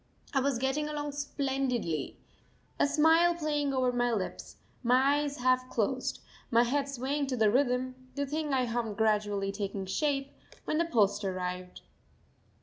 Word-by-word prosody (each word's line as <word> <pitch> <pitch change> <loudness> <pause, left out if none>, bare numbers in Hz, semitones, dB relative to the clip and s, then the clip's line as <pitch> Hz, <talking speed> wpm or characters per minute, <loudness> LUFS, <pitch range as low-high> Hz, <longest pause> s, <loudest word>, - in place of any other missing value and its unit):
I 270 - +3
was 270 -1 +1
getting 270 +4 -1
along 295 -1 -3
splendidly 270 - -2 0.6
a - - +4
smile 320 +4 +4
playing 295 -3 0
over 255 -2 +2
my 245 0 +1
lips, 205 -5 -4 0.3
my 265 +4 +4
eyes 290 -1 -2
half 255 0 +2
closed, 255 +3 -1 0.3
my 235 -1 +5
head 280 +3 0
swaying 275 +2 -2
to 260 -2 -2
the 215 -2 +4
rhythm, 255 0 +1 0.2
the 285 0 -1
thing 300 +1 -2
I 260 -2 +2
hummed 230 -3 -2
gradually 205 -2 +1
taking 200 -1 -4
shape 275 +7 -1 0.3
when 305 - 0
the 340 - +3
post 205 -8 +2
arrived. 180 -1 -4
255 Hz, 150 wpm, -30 LUFS, 220-285 Hz, 0.6 s, my